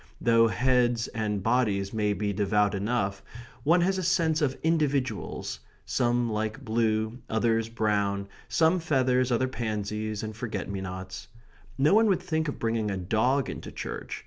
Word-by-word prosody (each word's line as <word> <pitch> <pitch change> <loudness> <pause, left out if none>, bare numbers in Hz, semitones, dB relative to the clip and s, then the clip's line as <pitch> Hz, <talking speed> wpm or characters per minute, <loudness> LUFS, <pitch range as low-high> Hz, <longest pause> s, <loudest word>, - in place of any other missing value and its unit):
Though 115 -1 +4
heads 120 -1 +2
and 105 -3 -2
bodies 105 -4 +1
may 105 -2 +1
be 100 +1 -2
devout 105 +1 +2
enough, 100 -1 -1 0.4
one 170 +4 +4
has 190 +2 +1
a - - -2
sense 165 -3 +2
of 135 -3 0
individuals 140 -8 -1 0.3
some 120 -1 +1
like 110 +4 -3
blue, 110 0 0
others 115 0 +1
brown; 100 -3 0 0.2
some 165 +2 +3
feathers, 130 -5 +1
others 130 +2 +1
pansies 110 -2 -3
and 110 0 -5
forget 105 -3 -4
me 100 -1 -4
nots. 95 0 -7 0.5
No 140 +6 +4
one 220 +1 +5
would 185 -3 +1
think 160 -3 -1
of 145 - -3
bringing 115 -2 -1
a 100 - -2
dog 110 +9 +1
into - - -7
church. - - -6
115 Hz, 155 wpm, -27 LUFS, 105-135 Hz, 0.5 s, one